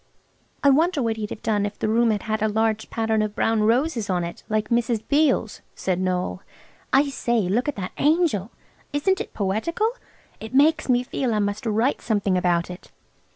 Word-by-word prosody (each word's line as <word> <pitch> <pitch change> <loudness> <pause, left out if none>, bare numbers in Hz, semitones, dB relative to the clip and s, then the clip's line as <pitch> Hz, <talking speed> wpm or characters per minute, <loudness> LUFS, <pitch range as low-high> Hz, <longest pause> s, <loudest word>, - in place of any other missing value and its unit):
"I 280 - +6
wonder 310 0 +2
what 225 -1 -1
he'd 210 -1 -4
have - - -8
done 210 -2 +1
if 205 0 -4
the - - -2
room 230 +2 +3
had 210 -2 0
had 215 -1 -2
a 220 - +2
large 220 0 0
pattern 220 -1 0
of 215 0 -2
brown 225 -1 +1
roses 230 0 +1
on 180 -2 0
it, 170 - -6
like 215 0 0
Mrs. 235 -2 +1
Beale's," 285 -7 +1
said 185 -1 -1
Noël. 185 0 -1 0.5
"I 280 +2 +4
say, 240 -4 0
look 205 +8 0
at 295 - -1
that 185 -3 -5
angel! 300 - +2 0.4
Isn't 380 +8 +1
it - - -8
poetical? 225 - 0 0.5
It 220 +3 -7
makes 310 +1 +3
me 245 0 +3
feel 245 -2 -2
I - - +1
must 205 +2 -2
write 225 +6 +1
something 205 -4 0
about 175 -1 +1
it." 180 - -11
220 Hz, 195 wpm, -23 LUFS, 205-265 Hz, 0.5 s, I